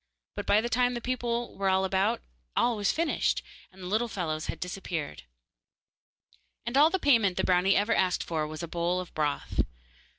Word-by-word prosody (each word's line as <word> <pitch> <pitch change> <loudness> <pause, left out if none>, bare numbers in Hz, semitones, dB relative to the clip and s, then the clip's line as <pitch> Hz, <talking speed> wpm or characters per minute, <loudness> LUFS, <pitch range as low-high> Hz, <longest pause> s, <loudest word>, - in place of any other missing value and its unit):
But - - -5
by 210 - +5
the 235 - -2
time 245 +1 +1
the - - -2
people 240 -1 -2
were 195 -1 0
about 190 +4 +1 0.3
all 240 - +3
was 205 -2 +1
finished, 330 0 0 0.3
and 190 0 -13
the - - -5
little 220 +5 +1
fellows 165 -7 -3
had - - -4
disappeared. 175 - -4 1.4
And 235 +2 -3
all 295 +3 +7
the 380 - 0
payment 230 - +3
the - - +1
brownie 185 +2 +3
ever 210 +3 +2
asked 185 -4 +1
for 155 -2 -2
was 155 +1 -7
a - - -3
bowl 170 +2 -1
of 185 - -7
broth. 150 -2 -2
195 Hz, 185 wpm, -28 LUFS, 180-235 Hz, 1.4 s, all